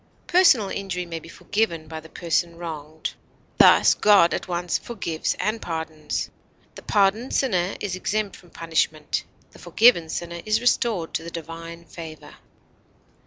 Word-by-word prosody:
Personal 330 Hz, -, +5 dB
injury 190 Hz, -3 st, -3 dB
may 165 Hz, -1 st, -5 dB
be 165 Hz, -, -14 dB
forgiven 170 Hz, -6 st, -2 dB
by 160 Hz, 0 st, -6 dB
the 160 Hz, +1 st, -14 dB
person 170 Hz, 0 st, -1 dB
wronged; 160 Hz, -2 st, -6 dB, 0.5 s
thus, -, -, +7 dB
God 200 Hz, -5 st, +5 dB
at -, -, -3 dB
once 175 Hz, -1 st, -1 dB
forgives 180 Hz, -9 st, -3 dB
and 220 Hz, +1 st, -1 dB
pardons; 160 Hz, -2 st, -4 dB, 0.4 s
the -, -, -11 dB
pardoned 205 Hz, +5 st, +1 dB
sinner 185 Hz, -8 st, +1 dB
is 195 Hz, -3 st, -3 dB
exempt 205 Hz, +2 st, -2 dB
from 175 Hz, -, -17 dB
punishment; 160 Hz, -2 st, -1 dB, 0.3 s
the -, -, -16 dB
forgiven 175 Hz, -2 st, +4 dB
sinner 170 Hz, +1 st, -5 dB
is 215 Hz, 0 st, +1 dB
restored 230 Hz, -7 st, +1 dB
to -, -, -2 dB
the 170 Hz, -, -6 dB
divine 165 Hz, +1 st, -8 dB
favor. 160 Hz, -1 st, -10 dB
170 Hz, 145 wpm, -24 LUFS, 165-205 Hz, 0.5 s, thus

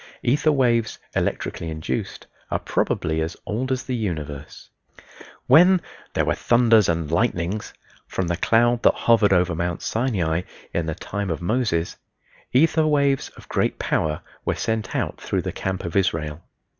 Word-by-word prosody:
Ether 145 Hz, +5 st, +3 dB
waves, 120 Hz, -5 st, +2 dB, 0.2 s
electrically 85 Hz, -, -2 dB
induced, 80 Hz, -1 st, -4 dB, 0.2 s
are -, -, 0 dB
probably 80 Hz, 0 st, -1 dB
as 80 Hz, +2 st, -3 dB
old 125 Hz, +5 st, -2 dB
as 130 Hz, -1 st, -1 dB
the 130 Hz, -, -3 dB
universe. 75 Hz, -, -5 dB, 0.8 s
When 180 Hz, +3 st, +7 dB, 0.4 s
"there -, -, +2 dB
were -, -, +2 dB
thunders 115 Hz, -4 st, +4 dB
and 80 Hz, -2 st, -1 dB
lightnings" 95 Hz, +1 st, 0 dB, 0.4 s
from 95 Hz, -, -2 dB
the 85 Hz, -, 0 dB
cloud 120 Hz, +6 st, +3 dB
that -, -, +4 dB
hovered 115 Hz, -3 st, +3 dB
over 90 Hz, -2 st, +3 dB
Mount 85 Hz, +1 st, -2 dB
Sinai 95 Hz, -9 st, 0 dB, 0.3 s
in 85 Hz, -1 st, -1 dB
the 80 Hz, -, -2 dB
time 100 Hz, +2 st, -4 dB
of 80 Hz, -, -2 dB
Moses, 90 Hz, -3 st, 0 dB, 0.5 s
ether 155 Hz, +3 st, +4 dB
waves 140 Hz, -2 st, +2 dB
of -, -, -14 dB
great -, -, 0 dB
power 75 Hz, -1 st, -1 dB, 0.2 s
were -, -, 0 dB
sent 110 Hz, -3 st, -2 dB
out -, -, -2 dB
through -, -, -1 dB
the -, -, -3 dB
camp 95 Hz, -1 st, -3 dB
of 85 Hz, -, -5 dB
Israel. 80 Hz, -5 st, 0 dB
100 Hz, 155 wpm, -23 LUFS, 85-120 Hz, 0.8 s, When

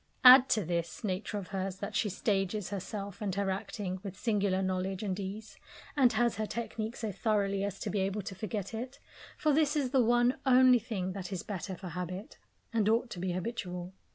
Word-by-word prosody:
Add 260 Hz, +1 st, +10 dB
to 215 Hz, -5 st, +2 dB
this 170 Hz, -1 st, -3 dB
nature 205 Hz, +1 st, -2 dB
of 195 Hz, -3 st, -6 dB
hers 190 Hz, -1 st, -2 dB
that 200 Hz, +1 st, -6 dB
she 210 Hz, -, +2 dB
stages 195 Hz, 0 st, -1 dB
herself 200 Hz, +1 st, -5 dB
and 195 Hz, -3 st, -1 dB
her 200 Hz, -1 st, 0 dB
acting 190 Hz, -1 st, -4 dB
with 195 Hz, -1 st, -7 dB
singular 200 Hz, -4 st, +1 dB
knowledge 185 Hz, +1 st, -1 dB
and 195 Hz, -2 st, -2 dB
ease, 200 Hz, +3 st, -6 dB, 0.4 s
and 260 Hz, -4 st, +5 dB
has 235 Hz, -1 st, +2 dB
her 215 Hz, 0 st, -1 dB
technique 225 Hz, -1 st, -4 dB
so 220 Hz, -3 st, -3 dB
thoroughly 200 Hz, -1 st, 0 dB
as 200 Hz, -1 st, -3 dB
to -, -, -2 dB
be 205 Hz, -, 0 dB
able 195 Hz, +2 st, -1 dB
to 195 Hz, 0 st, -5 dB
forget 200 Hz, 0 st, -4 dB
it 250 Hz, +5 st, -5 dB, 0.4 s
for 305 Hz, -1 st, +2 dB
this 300 Hz, 0 st, +3 dB
is 275 Hz, -4 st, 0 dB
the 265 Hz, -3 st, +4 dB
one 240 Hz, +2 st, +3 dB
only 255 Hz, -1 st, +6 dB
thing 205 Hz, -5 st, -3 dB
that 190 Hz, 0 st, -6 dB
is 185 Hz, -3 st, -3 dB
the 210 Hz, -, -5 dB
better 190 Hz, +1 st, -4 dB
for 180 Hz, +1 st, -8 dB
habit, 180 Hz, +4 st, -6 dB, 0.3 s
and 215 Hz, -2 st, +2 dB
ought 235 Hz, +2 st, +2 dB
to 175 Hz, -, -6 dB
be 180 Hz, 0 st, -1 dB
habitual. 180 Hz, -2 st, -4 dB
200 Hz, 210 wpm, -31 LUFS, 190-230 Hz, 0.4 s, Add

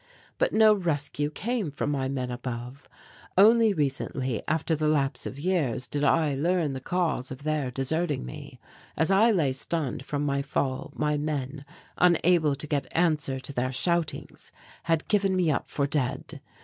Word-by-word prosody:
But -, -, +2 dB
no 220 Hz, -1 st, +6 dB
rescue 150 Hz, -6 st, -1 dB
came 215 Hz, +3 st, -2 dB
from 145 Hz, 0 st, -2 dB
my 135 Hz, -2 st, -1 dB
men 130 Hz, -2 st, -3 dB
above. 125 Hz, +2 st, -6 dB, 0.5 s
Only 220 Hz, +2 st, +6 dB
recently, 135 Hz, -, -2 dB
after 160 Hz, +1 st, 0 dB
the 155 Hz, 0 st, 0 dB
lapse 140 Hz, -4 st, 0 dB
of 135 Hz, -, -7 dB
years, 145 Hz, -7 st, 0 dB
did 145 Hz, +5 st, -3 dB
I 155 Hz, 0 st, +3 dB
learn 160 Hz, +1 st, 0 dB
the 130 Hz, -, -4 dB
cause 160 Hz, -5 st, -1 dB
of 130 Hz, +2 st, -8 dB
their 155 Hz, -3 st, -1 dB
deserting 145 Hz, -, -1 dB
me. 60 Hz, -, -10 dB, 0.4 s
As 160 Hz, +4 st, +2 dB
I 210 Hz, +4 st, +5 dB
lay 160 Hz, -, +2 dB
stunned 140 Hz, -1 st, -3 dB
from 145 Hz, +1 st, -2 dB
my 140 Hz, -1 st, 0 dB
fall, 135 Hz, -1 st, -2 dB
my 150 Hz, -1 st, 0 dB
men, 145 Hz, -2 st, -3 dB, 0.4 s
unable 170 Hz, -4 st, +4 dB
to 145 Hz, -, -7 dB
get 145 Hz, -3 st, -1 dB
answer 155 Hz, -6 st, +1 dB
to 140 Hz, -, -8 dB
their 130 Hz, 0 st, -1 dB
shoutings, 170 Hz, +4 st, -1 dB, 0.3 s
had 165 Hz, -1 st, 0 dB
given 200 Hz, -3 st, +2 dB
me 175 Hz, -4 st, +2 dB
up -, -, -2 dB
for 140 Hz, -, 0 dB
dead. 140 Hz, -3 st, -2 dB
150 Hz, 165 wpm, -27 LUFS, 135-170 Hz, 0.5 s, no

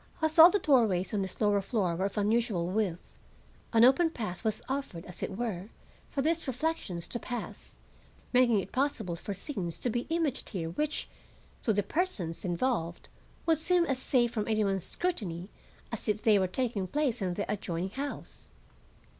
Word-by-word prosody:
As 315 Hz, 0 st, +1 dB
all 330 Hz, +2 st, +12 dB
the 410 Hz, -, +2 dB
doorways 225 Hz, -, +3 dB
on 205 Hz, -, +1 dB
this 190 Hz, -1 st, -5 dB
lower 205 Hz, -2 st, +3 dB
floor 195 Hz, -4 st, 0 dB
were 190 Hz, +3 st, 0 dB
of 200 Hz, +2 st, -3 dB
unusual 210 Hz, -3 st, +1 dB
width, 185 Hz, -2 st, 0 dB, 0.7 s
an 230 Hz, -1 st, +5 dB
open 270 Hz, +7 st, +6 dB
path 215 Hz, -, -5 dB
was 220 Hz, -2 st, 0 dB
offered, 265 Hz, -11 st, -4 dB
as 180 Hz, -, -7 dB
it 190 Hz, -, -3 dB
were, 210 Hz, -5 st, -3 dB, 0.4 s
for 275 Hz, -, -1 dB
these 330 Hz, +1 st, 0 dB
reflections 255 Hz, -, -2 dB
to 240 Hz, -, -2 dB
pass, 245 Hz, 0 st, -6 dB, 0.6 s
making 245 Hz, -4 st, +5 dB
it 195 Hz, -, -5 dB
possible 255 Hz, -10 st, 0 dB
for 200 Hz, +4 st, -5 dB
scenes 190 Hz, -, -4 dB
to 245 Hz, -, -1 dB
be 240 Hz, +2 st, -2 dB
imaged 325 Hz, -5 st, 0 dB
here 165 Hz, -5 st, -3 dB
which, 300 Hz, -, -2 dB, 0.5 s
to 225 Hz, -, +2 dB
the 205 Hz, -1 st, +2 dB
persons 200 Hz, -, -2 dB
involved, 175 Hz, -2 st, -1 dB, 0.4 s
would 325 Hz, -2 st, +3 dB
seem 350 Hz, +1 st, +3 dB
as 270 Hz, -5 st, -1 dB
safe 245 Hz, -3 st, +2 dB
from 215 Hz, -3 st, -2 dB
any 215 Hz, -1 st, +2 dB
one's 195 Hz, -3 st, 0 dB
scrutiny 195 Hz, -, -2 dB, 0.4 s
as 230 Hz, -, -5 dB
if 210 Hz, 0 st, 0 dB
they 215 Hz, -3 st, +5 dB
were 190 Hz, -, +2 dB
taking 210 Hz, -1 st, -1 dB
place 270 Hz, -2 st, 0 dB
in 180 Hz, -2 st, -1 dB
the 205 Hz, -, -1 dB
adjoining 185 Hz, -2 st, -2 dB
house. 280 Hz, +5 st, -5 dB
220 Hz, 180 wpm, -30 LUFS, 190-270 Hz, 0.7 s, all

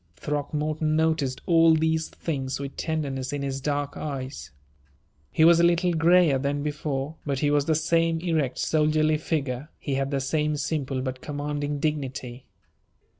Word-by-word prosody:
Throckmorton 150 Hz, -, -1 dB
noticed 155 Hz, -5 st, +1 dB
all 165 Hz, -1 st, +5 dB
these 160 Hz, 0 st, +1 dB
things 135 Hz, -5 st, -3 dB
with 140 Hz, -1 st, -6 dB
tenderness 140 Hz, -5 st, -2 dB
in 145 Hz, -1 st, -3 dB
his 135 Hz, 0 st, -3 dB
dark 145 Hz, 0 st, -2 dB
eyes. 130 Hz, -, -5 dB, 0.8 s
He 160 Hz, -, +4 dB
was 170 Hz, 0 st, +7 dB
a -, -, +4 dB
little 170 Hz, +1 st, +3 dB
grayer 165 Hz, -3 st, +4 dB
than 145 Hz, +1 st, -1 dB
before, 150 Hz, 0 st, -3 dB
but 140 Hz, -2 st, -2 dB
he 145 Hz, +2 st, +1 dB
was 145 Hz, -1 st, +2 dB
the 160 Hz, -, +2 dB
same 165 Hz, +1 st, +2 dB
erect, 160 Hz, -7 st, -1 dB
soldierly 155 Hz, 0 st, +2 dB
figure; 145 Hz, -3 st, -2 dB
he 140 Hz, -, -4 dB
had 135 Hz, 0 st, 0 dB
the 140 Hz, -1 st, 0 dB
same 150 Hz, +2 st, 0 dB
simple 140 Hz, -3 st, -2 dB
but 130 Hz, -1 st, -4 dB
commanding 145 Hz, 0 st, -3 dB
dignity. 135 Hz, -5 st, -3 dB
150 Hz, 155 wpm, -26 LUFS, 135-160 Hz, 0.8 s, was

